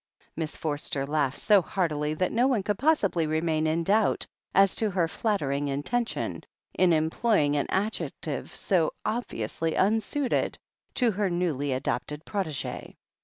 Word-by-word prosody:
Miss 160 Hz, -1 st, -4 dB
Forster 145 Hz, -2 st, -2 dB
laughed 145 Hz, -2 st, 0 dB
so 205 Hz, -3 st, +5 dB
heartily 155 Hz, -4 st, -1 dB
that 185 Hz, +3 st, 0 dB
no 240 Hz, +3 st, +3 dB
one 240 Hz, -7 st, +1 dB
could 205 Hz, 0 st, -1 dB
possibly 200 Hz, -, +2 dB
remain 155 Hz, 0 st, +1 dB
in 165 Hz, +2 st, +1 dB
doubt 205 Hz, +4 st, +2 dB, 0.3 s
as 195 Hz, 0 st, +4 dB
to 220 Hz, -, +1 dB
her 180 Hz, -4 st, +1 dB
flattering 145 Hz, -8 st, -1 dB
intention 225 Hz, -, -2 dB, 0.3 s
in 185 Hz, -1 st, +3 dB
employing 160 Hz, 0 st, +2 dB
an 145 Hz, -, 0 dB
adjective 205 Hz, +4 st, -2 dB
so 175 Hz, -6 st, +1 dB
obviously 165 Hz, -, -2 dB
unsuited 225 Hz, +7 st, +1 dB, 0.4 s
to 245 Hz, -3 st, +3 dB
her 200 Hz, -1 st, 0 dB
newly 165 Hz, -6 st, -1 dB
adopted 140 Hz, +3 st, -2 dB
protegee. 165 Hz, -9 st, -4 dB
170 Hz, 135 wpm, -27 LUFS, 150-210 Hz, 0.4 s, so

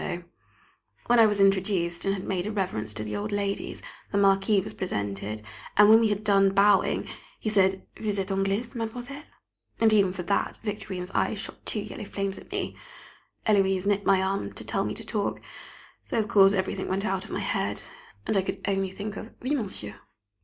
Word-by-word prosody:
[Sidenote: -, -, -2 dB
Wandering 175 Hz, -, -33 dB
Glances] -, -, -36 dB
When 240 Hz, 0 st, +6 dB
I 225 Hz, -, +8 dB
was 205 Hz, -1 st, 0 dB
introduced 190 Hz, -3 st, +2 dB
and 195 Hz, -, +2 dB
had 190 Hz, -, -6 dB
made 185 Hz, 0 st, -2 dB
a -, -, -2 dB
reverence 180 Hz, -, -2 dB
to 110 Hz, -, -3 dB
the 105 Hz, -, -4 dB
old 210 Hz, +1 st, -3 dB
ladies, 200 Hz, -1 st, -2 dB, 0.3 s
the 200 Hz, -, 0 dB
Marquis 195 Hz, +1 st, +4 dB
was -, -, -5 dB
presented, 105 Hz, -, -3 dB, 0.3 s
and 210 Hz, 0 st, +8 dB
when 220 Hz, +1 st, +9 dB
we 230 Hz, -, +3 dB
had 205 Hz, 0 st, -1 dB
done 195 Hz, -2 st, +4 dB
bowing, 200 Hz, 0 st, +4 dB, 0.3 s
he 215 Hz, -, -2 dB
said: 190 Hz, -2 st, +2 dB
"Vous 215 Hz, -2 st, -2 dB
êtes 195 Hz, 0 st, -2 dB
anglaise, 195 Hz, +5 st, 0 dB
mademoiselle?" 245 Hz, +5 st, -5 dB, 0.6 s
and, 225 Hz, -1 st, +5 dB
even 200 Hz, -3 st, +4 dB
for 180 Hz, -1 st, -5 dB
that, 200 Hz, +3 st, 0 dB
Victorine's 190 Hz, -4 st, -4 dB
eyes 220 Hz, -, 0 dB
shot -, -, -6 dB
two 215 Hz, -, 0 dB
yellow 210 Hz, 0 st, -7 dB
flames 195 Hz, -1 st, -3 dB
at -, -, -16 dB
me! -, -, -3 dB, 0.7 s
Héloise 195 Hz, -3 st, +3 dB
nipped 200 Hz, 0 st, +1 dB
my 190 Hz, -1 st, +4 dB
arm 195 Hz, +1 st, -2 dB
to -, -, -5 dB
tell -, -, 0 dB
me -, -, -3 dB
to -, -, -6 dB
talk, -, -, -2 dB, 0.6 s
so -, -, -4 dB
of 215 Hz, -2 st, +1 dB
course 195 Hz, -1 st, +6 dB
everything 190 Hz, -1 st, -1 dB
went 195 Hz, +2 st, -1 dB
out 190 Hz, -2 st, -1 dB
of -, -, -11 dB
my -, -, -3 dB
head, -, -, -1 dB, 0.5 s
and -, -, 0 dB
I 195 Hz, -, +4 dB
could 190 Hz, -, -4 dB
only 195 Hz, -1 st, 0 dB
think 200 Hz, +2 st, -6 dB
of 220 Hz, -, -8 dB
"Oui, 265 Hz, +4 st, 0 dB
monsieur." 190 Hz, -, -3 dB
195 Hz, 205 wpm, -27 LUFS, 190-210 Hz, 0.7 s, when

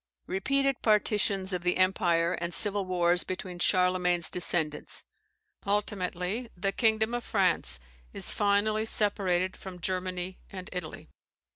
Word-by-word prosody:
Repeated 275 Hz, +7 st, 0 dB
partitions 205 Hz, -3 st, +2 dB
of 180 Hz, -, -1 dB
the 180 Hz, 0 st, +1 dB
empire 175 Hz, -2 st, +2 dB
and 170 Hz, 0 st, -3 dB
civil 205 Hz, -2 st, 0 dB
wars 175 Hz, -1 st, +2 dB
between 185 Hz, -1 st, -6 dB
Charlemagne's 180 Hz, -2 st, +2 dB
descendants. 160 Hz, -4 st, -1 dB, 0.6 s
Ultimately, 200 Hz, +1 st, -2 dB
the 195 Hz, +2 st, 0 dB
kingdom 220 Hz, +1 st, +2 dB
of 240 Hz, 0 st, -2 dB
France 190 Hz, -, +1 dB, 0.3 s
is -, -, -1 dB
finally 215 Hz, +2 st, +1 dB
separated 190 Hz, -4 st, +1 dB
from 185 Hz, -2 st, -9 dB
Germany 185 Hz, 0 st, -3 dB
and 185 Hz, -1 st, -8 dB
Italy. 180 Hz, -3 st, -6 dB
185 Hz, 120 wpm, -29 LUFS, 180-205 Hz, 0.6 s, partitions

